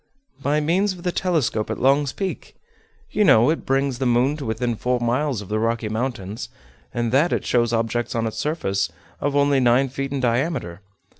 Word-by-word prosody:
"By 145 +2 +1
means 185 +6 +1
of 175 -2 -12
the 180 - 0
telescope 155 - 0
at - - -2
Long's 140 +1 +3
Peak. 195 +4 -5 0.6
You 210 - +2
know 120 - +6
it 165 - -4
brings 135 -1 +1
the 130 - +1
moon 125 +4 +2
to 145 - -6
within 115 +2 -1
four 125 +3 0
miles 125 +1 0
of - - -12
the 110 +1 0
Rocky 115 -1 -1
Mountains, 110 -3 -4 0.4
and 120 -1 -1
that 150 +7 +3
it - - -1
shows 120 -2 +2
objects 115 +1 -1
on 115 -1 0
its 110 - -4
surface 100 - -1 0.3
of 145 0 -1
only 140 -1 +3
nine 130 +2 +3
feet 135 +1 -4
in 140 - -1
diameter. 120 - -1
125 Hz, 195 wpm, -22 LUFS, 115-145 Hz, 0.6 s, know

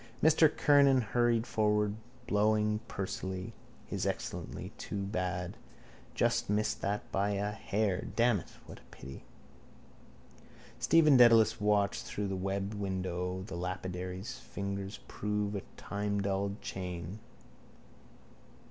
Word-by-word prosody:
Mr 160 0 +6
Kernan 140 -3 +5
hurried 120 +1 +2
forward, 105 -3 +1 0.3
blowing 105 -1 +2
pursily. 95 -1 -4 0.3
His - - -2
Excellency! - - -4
Too 100 -1 -3
bad! 90 -2 -3 0.6
Just - - +1
missed 105 +1 0
that 100 +1 -2
by 100 +1 +1
a 100 +1 -1
hair. 105 -3 -1
Damn 120 -3 +4
it! 85 - -11 0.2
What - - -11
a - - -23
pity! 65 0 -10 1.6
Stephen 150 +3 +6
Dedalus 115 -3 +6
watched 105 -1 +2
through 100 -1 -3
the 95 - -2
webbed 95 +2 -2
window 95 -2 -3
the 95 - -7
lapidary's 90 +4 -4
fingers 100 0 -5
prove 105 0 -2
a 100 - -2 0.2
timedulled 100 -1 -2
chain. 90 +1 -5
100 Hz, 110 wpm, -32 LUFS, 95-110 Hz, 1.6 s, Mr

